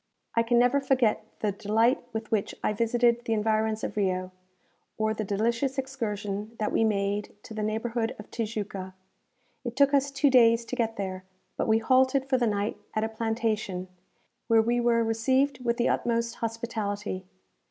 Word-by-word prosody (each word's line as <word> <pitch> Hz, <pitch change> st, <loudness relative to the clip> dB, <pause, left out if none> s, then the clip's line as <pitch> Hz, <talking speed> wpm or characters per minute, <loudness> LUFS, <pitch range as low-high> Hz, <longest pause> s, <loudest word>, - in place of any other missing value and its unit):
I 230 Hz, -, +3 dB
can 235 Hz, +1 st, +2 dB
never 250 Hz, +4 st, +4 dB
forget 255 Hz, -5 st, +2 dB, 0.2 s
the 210 Hz, -, +1 dB
delight 220 Hz, +5 st, +2 dB
with 220 Hz, -1 st, -5 dB
which 215 Hz, -3 st, 0 dB
I -, -, +1 dB
visited 235 Hz, +2 st, +2 dB
the 225 Hz, -, 0 dB
environs 220 Hz, 0 st, 0 dB
of -, -, -3 dB
Rio, 185 Hz, -2 st, 0 dB, 0.7 s
or 220 Hz, 0 st, +1 dB
the 215 Hz, -, -3 dB
delicious 230 Hz, +7 st, 0 dB
excursion 215 Hz, -5 st, -3 dB
that 215 Hz, -, -1 dB
we -, -, +2 dB
made 205 Hz, -1 st, 0 dB
to -, -, -10 dB
the 215 Hz, -, -3 dB
neighbourhood 225 Hz, +2 st, -1 dB
of 210 Hz, -, -12 dB
Tijuca. 205 Hz, -4 st, -4 dB, 0.7 s
It 240 Hz, -2 st, -5 dB
took 280 Hz, +1 st, +4 dB
us 280 Hz, 0 st, +3 dB
two 275 Hz, 0 st, +2 dB
days 230 Hz, -2 st, +5 dB
to 250 Hz, -, -4 dB
get 225 Hz, -2 st, -1 dB
there; 190 Hz, -2 st, -4 dB, 0.3 s
but -, -, -1 dB
we 220 Hz, 0 st, +4 dB
halted 260 Hz, +3 st, +3 dB
for 260 Hz, -1 st, +2 dB
the 240 Hz, -, +2 dB
night 205 Hz, 0 st, -1 dB, 0.2 s
at 215 Hz, -, +1 dB
a 220 Hz, -, -1 dB
plantation, 220 Hz, -4 st, -2 dB, 0.6 s
where 225 Hz, -1 st, +5 dB
we 240 Hz, +2 st, +1 dB
were 235 Hz, -1 st, +3 dB
received 260 Hz, +4 st, +1 dB
with 235 Hz, -1 st, +1 dB
the 240 Hz, -, +2 dB
utmost 235 Hz, -1 st, 0 dB
hospitality. 215 Hz, -4 st, -3 dB
225 Hz, 175 wpm, -27 LUFS, 210-240 Hz, 0.7 s, days